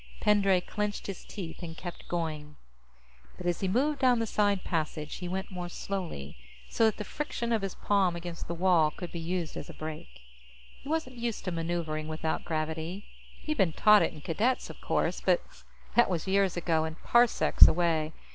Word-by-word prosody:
Pendray 195 -3 +4
clenched 210 +2 -3
his 195 -2 -6
teeth 175 -6 -7
and 165 -1 -7
kept 175 -2 -8
going. 155 -3 -3 0.8
But 180 - -8
as 175 -1 0
he 190 - -1
moved 275 +9 +1
down 255 -2 +4
the 230 - 0
side 205 -3 +1
passage, 155 -2 -3
he 180 - -5
went 190 +2 -4
more 180 -1 -5
slowly, 175 - -5 0.3
so 225 - +3
that 220 - +2
the - - -4
friction 235 -1 -3
of 220 - +1
his 195 -2 -4
palm 195 -4 +2
against 170 -1 -6
the 170 - -3
wall 170 -3 +4
could 175 +3 -8
be 170 - -5
used 170 0 -3
as - - -6
a - - -9
brake. 150 - -8 0.6
He 275 - -9
wasn't 305 -6 -2
used 235 -2 -3
to 185 - -1
maneuvering 165 -2 -2
without 160 0 -2
gravity; 160 +4 -3 0.4
he'd 305 0 -2
been 185 -6 +3
taught 210 +4 +6
it - - +1
in 155 - -11
Cadets, 225 - 0
of - - -15
course, - - 0
but - - +3 0.5
that 240 - +5
was 175 -4 -1
years 195 -1 +2
ago 165 -2 +1
and 160 0 -4
parsecs 240 -1 +6
away. 160 -2 +1
180 Hz, 190 wpm, -29 LUFS, 160-205 Hz, 0.8 s, taught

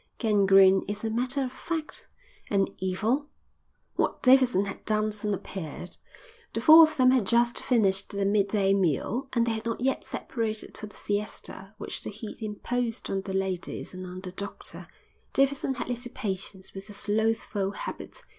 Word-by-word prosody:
"Gangrene 195 -3 +5
is 205 +1 -3
a 220 - -1
matter 255 +4 0
of 255 - -3
fact." 325 +4 -5 0.4
"And 195 -1 +1
Evil?" 220 +10 0 0.7
What - - 0
Davidson 255 -6 +5
had 195 - -7
done 215 0 +1
soon 210 0 -3
appeared. 180 -3 -6 0.6
The - - -1
four 315 +7 +9
of 315 -1 +5
them 255 -1 +6
had 250 -7 +2
just 235 +2 +3
finished 195 -6 +2
their 200 0 -1
midday 200 -1 +2
meal, 195 - 0
and 235 -2 +3
they 235 - 0
had 220 0 -3
not 230 - -2
yet 265 +2 0
separated 220 -3 -4
for 215 - -7
the 205 - -16
siesta 205 -1 -5
which 210 - -4
the - - -4
heat 215 +2 -8
imposed 230 +2 -3
on 195 - 0
the 190 0 -6
ladies 190 -2 -3
and 185 0 -7
on 180 +1 -8
the 185 -1 -7
doctor. 200 +2 -7 0.5
Davidson 275 0 +1
had - - -4
little 245 0 -4
patience 190 -4 -5
with 195 +1 -8
the 210 - -10
slothful 205 -1 0
habit. - - -7
215 Hz, 170 wpm, -27 LUFS, 195-245 Hz, 0.7 s, four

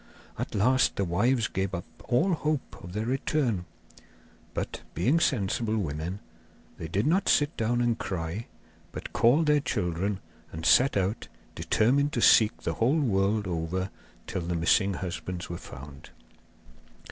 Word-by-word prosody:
At - - -4
last 125 +6 +3
the 100 - 0
wives 110 +7 +2
gave 95 0 -2
up 85 - -5 0.2
all 130 - +2
hope 150 -3 -2
of 90 - -9
their 105 +2 -2
return; 125 -6 0 0.9
but, - - -4
being 130 - +2
sensible 110 - 0
women, 85 +1 -3 0.6
they 80 - -5
did 95 +6 0
not 185 +5 +2
sit 145 +2 +3
down 120 +2 0
and 120 -1 +1
cry, 90 +4 -4 0.4
but - - -8
called 130 +8 +4
their 150 -1 +4
children, 95 - -1 0.3
and 80 +1 -6
set 130 +2 +5
out, 100 +3 -1 0.3
determined 140 +6 +2
to - - 0
seek 110 -1 +5
the - - -1
whole 130 +8 +2
world 105 -4 +1
over 90 +2 -2 0.3
till 95 - -3
the 85 +1 -2
missing 90 +4 +2
husbands 90 -1 -5
were 85 - -4
found. 70 +1 -11
105 Hz, 145 wpm, -28 LUFS, 90-125 Hz, 0.9 s, set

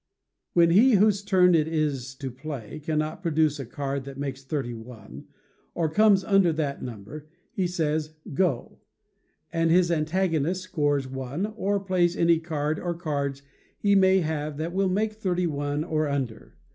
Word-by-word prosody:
When 170 -1 +5
he 235 +8 +6
whose 205 0 +4
turn 185 -3 +4
it 155 -2 +3
is 145 -5 -2
to 135 -1 -6
play 135 -1 -7
cannot 155 +1 -2
produce 155 -4 +1
a 135 - -5
card 140 +1 -3
that 135 -1 -9
makes 135 -1 -5
thirty 135 -4 -3
one, 110 - -11 0.5
or 160 -3 0
comes 205 +1 +4
under 195 -3 +4
that 145 -3 -2
number, 120 +6 -8 0.3
he 185 -2 0
says, 155 -2 -2 0.2
"Go," 145 -5 -1 0.7
and 165 0 +2
his 175 +1 +4
antagonist 170 +1 0
scores 145 -7 0
one, 135 +7 -4
or 200 -1 0
plays 185 -3 +1
any 170 -1 +4
card 155 -2 -2
or 175 -1 -3
cards 140 -5 -3 0.3
he 200 -1 +2
may 190 -1 +5
have 155 -2 -3
that 165 +3 -3
will 195 0 +1
make 210 +3 0
thirty 185 -4 -1
one, 145 -1 -2
or 155 -2 0
under. 130 -6 -4
155 Hz, 160 wpm, -26 LUFS, 140-180 Hz, 0.7 s, he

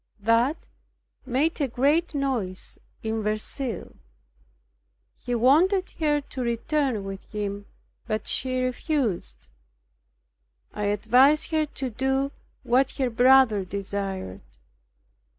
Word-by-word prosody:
That 230 +8 +2 0.7
made 290 +6 0
a 280 - +2
great 290 +7 +1
noise 245 -10 -2 0.2
in 220 0 -1
Verceil. 215 +1 -4 1.2
He 245 0 -4
wanted 340 - +3
her 295 -2 +2
to 275 -1 -7
return 240 0 0
with 195 0 -7
him, 205 -1 -4 0.4
but 215 -2 -2
she 255 -1 -1
refused. 255 - -2 1.3
I 210 - -3
advised 260 +10 +3
her 310 -1 +1
to 265 -3 -5
do 265 +3 0 0.3
what 260 +3 +3
her 260 -3 0
brother 245 -3 +5
desired. 195 - -4
250 Hz, 100 wpm, -25 LUFS, 210-275 Hz, 1.3 s, brother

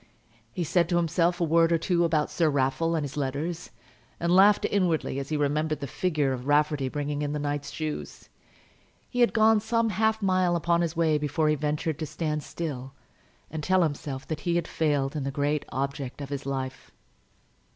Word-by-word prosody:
He 175 - -3
said 170 +1 +1
to 175 - +2
himself 175 +1 +1
a - - +1
word 165 +1 +3
or 165 - +4
two 175 +1 +1
about 155 -3 +1
Sir 165 -3 +2
Raffle 140 +4 +1
and 155 - 0
his 145 0 -6
letters, 150 +5 -3 0.5
and 170 +1 +2
laughed 200 +2 +6
inwardly 170 -8 0
as 140 - -6
he 155 - 0
remembered 150 +1 0
the 140 - -4
figure 150 -1 0
of 125 +1 -6
Rafferty 145 -2 +2
bringing 145 +1 -3
in 145 0 -2
the - - -1
knight's 145 -1 -3
shoes. 155 -1 -5 0.8
He 245 - -3
had 240 - +5
gone 220 -1 +4
some 230 +1 +1
half 220 +2 +1
mile 185 -3 +2
upon 170 +1 +1
his 170 -2 -1
way 160 -2 +2
before 150 +1 0
he 150 - +3
ventured 150 +1 -2
to 155 - -3
stand 150 0 -2
still 135 -5 -5 0.6
and 160 0 -4
tell 185 +3 +3
himself 145 -3 -3
that 155 -1 -3
he 175 -2 -1
had 170 -1 0
failed 145 -3 0
in 145 - -2
the 135 - -2
great 145 +1 -1
object 135 -1 -3
of 140 -1 -6
his 140 -1 -5
life. 135 -1 -4
155 Hz, 195 wpm, -27 LUFS, 145-170 Hz, 0.8 s, laughed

